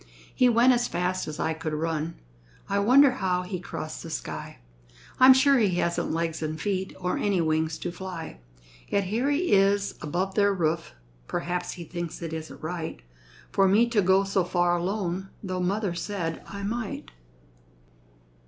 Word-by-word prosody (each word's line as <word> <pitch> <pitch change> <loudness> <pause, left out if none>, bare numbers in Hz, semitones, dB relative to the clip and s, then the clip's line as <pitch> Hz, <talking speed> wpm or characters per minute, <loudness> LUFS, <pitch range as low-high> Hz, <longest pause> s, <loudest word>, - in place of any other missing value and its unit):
He 250 - +4
went 240 +2 +5
as 240 0 +1
fast 180 +1 -1
as 155 0 -6
I 160 - 0
could 160 -1 -4
run; 160 +1 -2 0.5
I 200 0 +1
wonder 255 +6 +6
how 185 -7 -1
he 180 0 -4
crossed 180 - -6
the - - -8
sky? - - -6 0.6
I'm 260 +1 +9
sure 265 +1 +5
he 200 -6 +2
hasn't 170 0 0
legs 165 0 -2
and 155 0 -3
feet 190 0 -2
Or 180 0 -1
any 200 -3 +1
wings 160 -1 0
to 175 - -4
fly. 175 - -7 0.5
Yet 200 - +1
here 225 +9 0
he 310 +5 +1
is 200 0 +3
above 180 +6 -2
their 200 -1 +3
roof; 165 -1 -1 0.3
Perhaps 175 0 -2
he 175 - -8
thinks 175 0 -5
it 165 -1 -4
isn't 160 -1 -7
right 160 - -5 0.5
For 195 -1 +4
me 215 +5 +4
to 225 -3 +3
go 190 +1 +4
so 195 -1 +1
far 175 0 +2
alone, 190 +1 -2
Tho' 185 -2 -3
mother 195 +1 0
said 170 -2 -3
I 200 0 -7
might. 215 - -4
185 Hz, 170 wpm, -27 LUFS, 170-205 Hz, 0.6 s, I'm